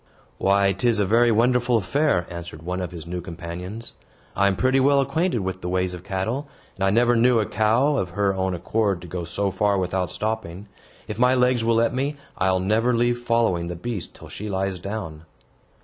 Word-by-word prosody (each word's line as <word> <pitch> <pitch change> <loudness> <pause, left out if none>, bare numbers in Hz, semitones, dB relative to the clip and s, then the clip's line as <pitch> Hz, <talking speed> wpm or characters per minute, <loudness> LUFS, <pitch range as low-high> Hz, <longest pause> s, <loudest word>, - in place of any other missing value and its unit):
"Why, 100 0 +3
'tis 115 +4 +1
a 105 - +2
very 115 +4 +4
wonderful 120 +1 +3
affair," 125 - +1
answered 85 -2 -8
one 90 +2 -3
of 90 - -3
his 85 -3 -9
new 90 +1 -4
companions. 85 +6 -7 0.4
"I 100 - +3
am 100 - +1
pretty 130 +4 +2
well 140 +1 +4
acquainted 140 - 0
with 95 0 -4
the 90 - -4
ways 90 0 0
of 90 0 -8
cattle, 105 +9 -3 0.3
and 95 - -4
I 95 - +4
never 120 +4 +3
knew 120 0 +4
a 110 - +1
cow, 115 +9 +2
of 90 - -1
her 100 +2 0
own 95 -1 -1
accord, 100 +1 0
to - - -9
go 85 0 -5
so 100 +3 -1
far 100 +2 +1
without 90 -1 -1
stopping. 105 -3 -4 0.4
If 105 +1 -6
my 125 +1 +4
legs 125 -2 +2
will 115 0 +2
let 115 0 +2
me, 140 +3 -2 0.2
I'll 95 0 +1
never 110 +6 +2
leave 120 +1 +1
following 115 -8 +1
the 85 - -4
beast 100 +1 -5
till - - -12
she 105 +1 -7
lies 95 -1 -2
down." 90 -5 -6
100 Hz, 205 wpm, -23 LUFS, 90-120 Hz, 0.4 s, very